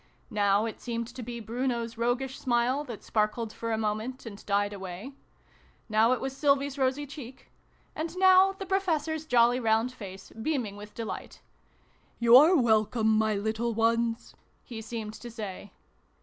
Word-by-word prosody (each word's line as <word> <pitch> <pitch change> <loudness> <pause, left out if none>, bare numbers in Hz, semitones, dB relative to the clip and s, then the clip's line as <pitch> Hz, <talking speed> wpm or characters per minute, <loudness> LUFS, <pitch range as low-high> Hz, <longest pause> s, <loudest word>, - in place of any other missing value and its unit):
Now 205 0 +2
it 225 - -6
seemed 235 -1 -3
to 255 - -7
be 240 0 -6
Bruno's 235 0 -2
roguish 245 +3 -1
smile 250 +3 +1
that 235 -6 -8
sparkled 215 +1 -1
for 230 0 -4
a 220 - +1
moment, 220 +4 -3
and 210 -2 -9
died 205 0 +1
away: 190 +6 -7 0.7
now 220 +1 +3
it 255 - +2
was 265 0 -4
Sylvie's 280 -1 +2
rosy 265 +2 +1
cheek: 270 -3 -11 0.4
and 325 +3 -4
now 375 +1 +6
the 390 0 -7
Professor's 320 -5 -1
jolly 245 -1 +4
round 225 +1 +2
face, 195 -5 -10
beaming 225 -3 -2
with 210 +1 -11
deT 230 - -4
light. - - -7 0.4
" - - -36
You're 260 +10 +7
welcome, 220 -1 +2
my 215 -1 +2
little 220 +3 -1
ones! 230 +1 0 0.2
" - - -40
he 230 -3 -8
seemed 220 -1 -6
to 240 +2 -9
say. 205 -3 -7
235 Hz, 165 wpm, -28 LUFS, 220-265 Hz, 0.7 s, You're